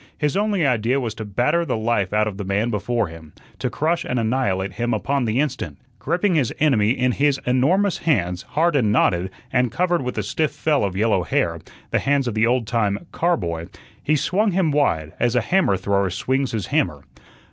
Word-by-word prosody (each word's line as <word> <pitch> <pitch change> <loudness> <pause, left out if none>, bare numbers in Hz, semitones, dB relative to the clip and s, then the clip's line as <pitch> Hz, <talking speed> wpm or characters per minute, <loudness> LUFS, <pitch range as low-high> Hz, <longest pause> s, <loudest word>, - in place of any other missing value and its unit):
His 150 -2 0
only 200 -4 +1
idea 125 0 +1
was 115 -5 -3
to 110 - -7
batter 120 - +1
the 165 - -2
life 110 -4 0
out 105 0 +2
of 100 -2 -5
the 100 - -4
man 100 +5 0
before 115 +2 0
him, 80 -3 -11 0.3
to - - -1
crush 165 +3 0
and 125 - -2
annihilate 110 -5 0
him 120 +1 -1
upon 135 +4 -1
the 115 +3 0
instant. 130 - -2 0.2
Gripping 180 +2 0
his 145 -8 +1
enemy 125 -9 +3
in 125 +1 +1
his 140 +2 +1
enormous 165 +11 +2
hands, 90 - 0
hard 165 +1 0
and 115 -7 +2
knotted, 90 -3 +2 0.2
and 125 -2 +2
covered 175 +1 +1
with 125 -2 -4
a 110 - 0
stiff 155 +10 0
fell 150 -7 +1
of 95 -2 -2
yellow 105 -2 +2
hair 85 - -1 0.3
the - - +2
hands 140 -2 +1
of 120 - -1
the 110 +2 +2
old 120 -1 +1
time 105 +2 -1
car 170 0 +1
boy 85 - -4 0.3
he 155 - +1
swung 195 +7 +1
him 175 -4 +2
wide, 80 - +1
as 120 0 +1
a 125 - +3
hammer 170 - +2
thrower 100 +1 0
swings 130 +8 -1
his 110 -5 -2
hammer. 90 - -1
120 Hz, 205 wpm, -22 LUFS, 100-150 Hz, 0.3 s, enemy